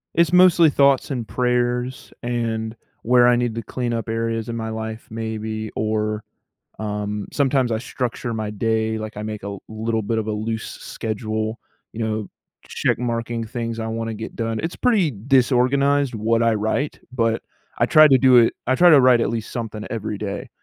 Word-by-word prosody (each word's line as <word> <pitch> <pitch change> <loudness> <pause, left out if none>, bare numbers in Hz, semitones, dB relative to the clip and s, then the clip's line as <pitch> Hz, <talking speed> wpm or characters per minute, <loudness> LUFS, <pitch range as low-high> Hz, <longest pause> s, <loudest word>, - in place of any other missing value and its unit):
It's 170 +1 +3
mostly 180 -3 +6
thoughts 140 -2 +3
and 125 -5 -3
prayers 125 +1 -1
and 115 -2 -2 0.3
where 120 +1 +5
I 120 0 +5
need 120 -2 -1
to 115 - -3
clean 120 +3 -3
up 115 0 -3
areas 115 0 -2
in 115 - -3
my 110 -1 -3
life 110 0 -6
maybe 110 -1 -4
or, 110 0 -1 0.6
um, 105 -1 -3
sometimes 135 -3 +2
I 110 - 0
structure 120 -1 -4
my 110 -1 -3
day. 110 +1 0
Like, 110 -1 -7
I 105 - -4
make 105 -2 -5
a 100 0 -5
little 110 +1 -2
bit 110 +2 -1
of 110 - -2
a 110 - -1
loose 110 +1 -3
schedule, 110 0 -4 0.3
you 115 - -7
know, 110 -1 -2 0.4
check - - 0
marking 115 -1 -2
things 115 0 -4
I 110 - -3
wanna 115 0 -3
get 110 +1 -7
done. 115 -1 -2
It's 165 +2 -3
pretty 210 -10 +2
disorganized 135 +3 +2
what 115 +1 +1
I 115 -1 +3
write, 110 +7 -1
but 115 -2 0 0.4
I - - +3
try 155 0 +7
to 135 -2 +6
do 130 -1 +6
it 115 -1 +4
I 130 - +3
try 175 +6 +6
to 150 -4 +8
write 125 -2 +5
at - - +1
least 115 -2 -4
something 110 -3 -5
every 110 -2 -3
day, 100 -1 -5
115 Hz, 185 wpm, -22 LUFS, 110-125 Hz, 0.6 s, to